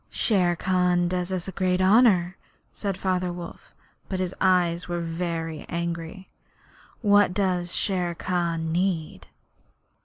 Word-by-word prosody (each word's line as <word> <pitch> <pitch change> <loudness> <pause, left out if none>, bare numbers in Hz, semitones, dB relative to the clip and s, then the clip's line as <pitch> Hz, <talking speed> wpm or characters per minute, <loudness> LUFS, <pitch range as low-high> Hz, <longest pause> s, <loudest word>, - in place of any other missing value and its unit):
'Shere 180 -6 +2
Khan 180 -1 +1
does 180 +1 -2
us 185 -1 -3
great 185 0 0
honour,' 190 -3 +4 0.4
said 195 -3 -4
Father 185 -2 -1
Wolf, 175 -1 -10 0.3
but 190 - -2
his 185 0 -2
eyes 180 -2 +2
were 175 -1 -2
very 165 -1 -3
angry. 170 +2 -4 0.7
'What 205 -4 +4
does 180 -3 0
Shere 180 -3 0
Khan 170 -3 -2
need?' 175 -2 -2
180 Hz, 120 wpm, -25 LUFS, 170-185 Hz, 0.7 s, honour